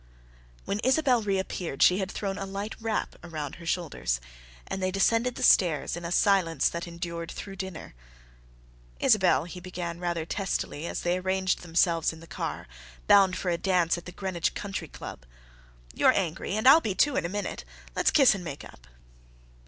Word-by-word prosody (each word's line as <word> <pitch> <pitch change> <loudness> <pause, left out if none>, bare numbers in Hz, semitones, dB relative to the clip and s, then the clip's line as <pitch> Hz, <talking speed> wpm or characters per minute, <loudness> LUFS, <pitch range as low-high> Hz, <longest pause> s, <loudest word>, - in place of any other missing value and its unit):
When 200 - -2
Isabelle 260 0 +3
reappeared 190 -7 -1
she 180 +2 +5
had 190 -1 -2
thrown 195 -1 -3
a 195 - -4
light 200 +2 -4
wrap 220 -1 -2
about 155 -5 -6
her 170 -1 -10
shoulders, 160 - -1 0.5
and 190 - -4
they 185 - +1
descended 230 +6 +2
the - - -4
stairs 165 -5 +4
in 175 - -7
a 170 - -4
silence 185 -3 +3
that 170 +1 -5
endured 170 -1 -5
through 195 -1 -8
dinner. 190 -4 -7 1.1
"Isabelle," 190 - +4
he 180 +2 -8
began 175 -2 -6
rather 175 -2 -2
testily, 170 -4 -3
as - - -4
they 175 +1 0
arranged 190 0 0
themselves 165 -1 +2
in 160 - -12
the 165 - -12
car, - - -5 0.4
bound 195 -2 +5
for 180 - -1
a 170 - -1
dance 180 -3 +2
at 175 - -8
the 180 - -8
Greenwich 180 -2 -2
Country 200 -2 -4
Club, - - -9 0.7
"you're - - +5
angry, 185 +1 -2
and 220 - +1
I'll 310 +5 +9
be, 205 -8 -2
too, 290 +5 +3
in - - +1
a 170 - -2
minute. 205 +2 -4 0.3
Let's - - +3
kiss 270 -6 +6
and 195 -3 -6
make 145 -5 -7
up." - - -15
185 Hz, 180 wpm, -27 LUFS, 170-195 Hz, 1.1 s, I'll